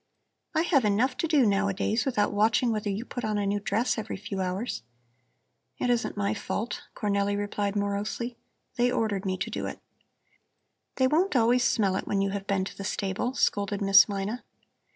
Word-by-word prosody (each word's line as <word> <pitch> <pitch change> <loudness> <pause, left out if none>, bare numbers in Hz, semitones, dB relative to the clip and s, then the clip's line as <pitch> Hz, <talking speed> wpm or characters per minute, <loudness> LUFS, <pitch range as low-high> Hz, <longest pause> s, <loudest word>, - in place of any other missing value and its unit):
"I 320 - +3
have 290 -7 +3
enough 220 +5 +2
to 330 - 0
do 300 -5 +4
nowadays 200 +2 +1
without 210 -7 +1
watching 220 +3 +3
whether 215 -1 -2
you 205 +4 -3
put 245 - -6
on 215 -1 0
a 205 - 0
new 200 +1 0
dress 220 +4 0
every 215 -2 -5
few 195 -1 -4
hours." 185 - -2 1.0
"It 250 - +1
isn't 235 -3 -1
my 200 +1 0
fault," 220 +2 -3
Cornelli 200 -1 0
replied 205 0 -2
morosely. 205 +4 -2 0.4
"They 245 +1 +3
ordered 215 -5 -1
me 185 0 -1
to - - -3
do - - -3
it." - - -7 1.2
"They 260 - +3
won't 315 +5 +2
always 245 +1 +4
smell 200 -6 +2
it - - -5
when 200 - 0
you 195 0 +1
have 200 0 -5
been 195 -2 +1
to - - -8
the 195 - -7
stable," 200 +6 -2
scolded 200 -4 +1
Miss 200 0 +6
Mina. 205 +4 -3
205 Hz, 185 wpm, -27 LUFS, 200-240 Hz, 1.2 s, Miss